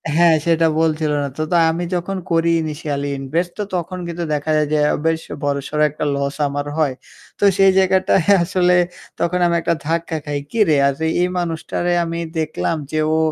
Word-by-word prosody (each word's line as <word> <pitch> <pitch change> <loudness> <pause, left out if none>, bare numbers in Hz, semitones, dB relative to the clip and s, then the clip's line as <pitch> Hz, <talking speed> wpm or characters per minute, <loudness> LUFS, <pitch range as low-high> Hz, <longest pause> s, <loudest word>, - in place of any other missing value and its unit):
হ্যাঁ, 170 -1 +5
সেটা 165 -1 +3
বলছিল 155 -1 +1
না। - - -2
তো - - -2
তো - - +2 0.2
আমি 170 +2 -3
যখন 185 +2 -3
করি 165 0 +2
initially 145 -2 -3
invest, 165 +6 -2
তো - - 0
তখন 180 +1 -3
কিন্তু 170 0 -4
দেখা 150 +1 -1
যায় 150 -1 +1
যে - - +3 0.2
আ - - +1
বেশ 165 0 +1 0.2
বড়-সড় 145 +1 -1
একটা 150 +1 -4
লস 140 0 -2
আমার 145 0 -3
হয়। 150 -4 +1 0.5
তো - - -2
সেই 195 -1 +6
জায়গাটায় 190 -1 +3 0.2
আসলে 180 0 +2 0.4
তখন 180 +1 0
আমি 170 0 +2
একটা 170 - 0
ধাক্কা 165 0 -1
খাই। 145 -1 -2
"কিরে? 210 -9 +3
আর 140 - +1 0.3
এই - - +2
মানুষটারে 175 +1 -2
আমি 165 0 -4 0.2
দেখলাম 155 +1 -1 0.2
যে 155 - 0 0.2
ও - - +2
165 Hz, 185 wpm, -19 LUFS, 150-175 Hz, 0.5 s, সেই